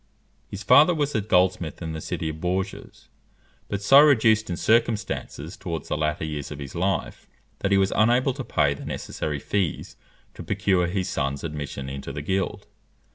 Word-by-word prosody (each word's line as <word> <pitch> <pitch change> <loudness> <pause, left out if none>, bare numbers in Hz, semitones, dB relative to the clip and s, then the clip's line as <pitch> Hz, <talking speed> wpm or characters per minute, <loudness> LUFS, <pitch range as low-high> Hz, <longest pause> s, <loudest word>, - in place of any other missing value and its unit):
His 100 0 -7
father 155 - +6
was 145 -2 -1
a 110 - +1
goldsmith 90 -4 +1
in 80 -2 -5
the 80 - -5
city 80 - -3
of 80 0 -7
Bourges; 95 +2 -4 0.6
but 100 0 -4
so 135 +6 +8
reduced 110 -8 +4
in 85 - -2
circumstances 110 -9 0
towards 85 -4 -6
the - - 0
latter 75 0 -1
years 75 -2 -5
of 75 - -7
his 70 -2 -8
life, 95 +2 -2 0.3
that 100 - -1
he 100 - +5
was 95 0 +2
unable 120 +5 +3
to - - -6
pay 70 - +1
the 70 - -10
necessary 75 -2 -4
fees 90 +1 -2 0.4
to - - -10
procure 90 -3 +1
his 95 +1 -2
son's 70 +1 -2
admission 75 -4 -5
into 70 0 -6
the 75 +1 -6
guild. 95 +4 -2
90 Hz, 180 wpm, -24 LUFS, 75-105 Hz, 0.6 s, so